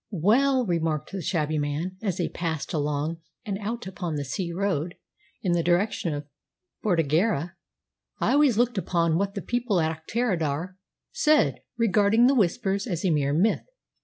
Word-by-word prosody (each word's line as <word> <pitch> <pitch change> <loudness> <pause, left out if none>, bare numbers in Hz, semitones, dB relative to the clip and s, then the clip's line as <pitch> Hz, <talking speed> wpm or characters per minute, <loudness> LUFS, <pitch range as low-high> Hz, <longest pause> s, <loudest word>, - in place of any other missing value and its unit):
"Well," 245 - +3
remarked 165 -5 -1
the 195 -1 -4
shabby 155 -3 0
man 150 +6 -3
as 195 -5 -1
they 175 - 0
passed 160 -4 -4
along 150 +1 -1 0.3
and 200 -2 -3
out 230 +3 -4
upon 180 -4 -4
the 145 -1 -3
sea 170 +6 -3
road 180 -2 -1 0.5
in 180 - +1
the 175 0 +2
direction 175 0 +1
of 145 0 -5 0.6
Bordighera, 170 -1 +1 0.7
"I - - +1
always 285 -6 +4
looked 240 -3 +2
upon 170 -2 +1
what 200 0 -1
the 200 - -4
people 240 -6 0
at 160 0 0
Auchterarder 180 -7 -1 0.4
said 310 -10 +3 0.2
regarding 220 +1 +4
the 265 - +5
Whispers 200 -2 +1
as 175 -3 -2
a 180 - +3
mere 145 -2 +1
myth. 180 +9 +1
180 Hz, 160 wpm, -26 LUFS, 160-215 Hz, 0.7 s, the